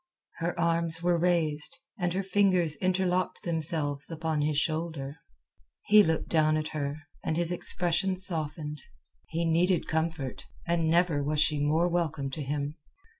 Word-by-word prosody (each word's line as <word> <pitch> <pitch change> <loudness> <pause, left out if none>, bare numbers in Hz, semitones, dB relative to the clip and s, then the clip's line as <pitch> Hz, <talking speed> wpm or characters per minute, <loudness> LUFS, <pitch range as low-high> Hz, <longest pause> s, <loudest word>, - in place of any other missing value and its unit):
Her 170 +1 -3
arms 165 -1 +1
were 175 -1 +2
raised, 165 -4 +1 0.2
and 175 -1 0
her 195 +2 -1
fingers 185 -5 +2
interlocked 185 +1 0
themselves 155 -4 +1
upon 160 -2 -2
his 150 0 0
shoulder. 155 -2 -2 0.7
He 210 +1 +7
looked 160 -5 0
down 155 -1 +3
at 155 0 -3
her, 145 0 -4 0.2
and 160 - -1
his 170 0 +2
expression 180 +1 0
softened. 155 -5 -3 0.5
He 170 +1 -2
needed 170 +2 +2
comfort, 160 -4 -3 0.2
and 165 -1 +1
never 170 -3 +2
was 150 +1 -1
she 150 -1 +2
more 155 +4 +2
welcome 160 -6 -1
to 150 - -5
him. 145 +2 -3
165 Hz, 145 wpm, -28 LUFS, 150-175 Hz, 0.7 s, He